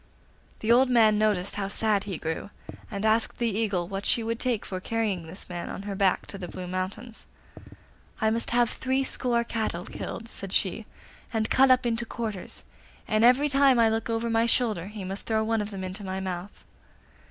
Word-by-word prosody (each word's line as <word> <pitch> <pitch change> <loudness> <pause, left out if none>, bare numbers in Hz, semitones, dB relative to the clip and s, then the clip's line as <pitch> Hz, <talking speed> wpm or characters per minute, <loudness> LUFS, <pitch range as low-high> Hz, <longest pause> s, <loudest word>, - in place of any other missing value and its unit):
The 220 - +1
old 255 +2 +6
man 220 -4 +5
noticed 205 -3 +1
how 200 -1 -1
sad 205 0 +1
he 195 -4 -4
grew, 160 +5 -4 0.4
and 200 0 -3
asked 220 +1 +2
the 235 -4 0
Eagle 200 -6 0
what 195 +1 -4
she 230 - +2
would 230 +1 -2
take 245 -5 -1
for 185 - -4
carrying 200 -5 -2
this 175 +4 -5
man 175 -1 -5
on 195 - -6
her 200 0 -4
back 195 -1 +2
to 195 - -8
the 180 - -5
Blue 185 +1 -7
Mountains. 185 +6 -5 0.9
'I 220 -1 +2
must 230 +1 -1
have 240 -1 +3
threescore 260 -2 0
cattle 220 -6 -3
killed,' 230 - -6
said 195 -4 -6
she, 205 +3 0 0.4
'and 220 -1 -1
cut 270 +1 +5
up 255 0 +5
into 235 0 0
quarters, 220 -6 -5 0.4
and 215 0 +2
every 255 +5 +6
time 275 -2 +4
I 230 -1 +5
look 225 +1 -1
over 230 +1 0
my 225 +1 +3
shoulder 215 -7 +1
he 210 -1 -7
must 190 +2 -5
throw 220 -1 +1
one 225 0 +1
of 205 - -4
them 195 -3 -6
into 185 +2 -6
my 190 0 -3
mouth. 185 +1 -6
220 Hz, 200 wpm, -27 LUFS, 195-230 Hz, 0.9 s, old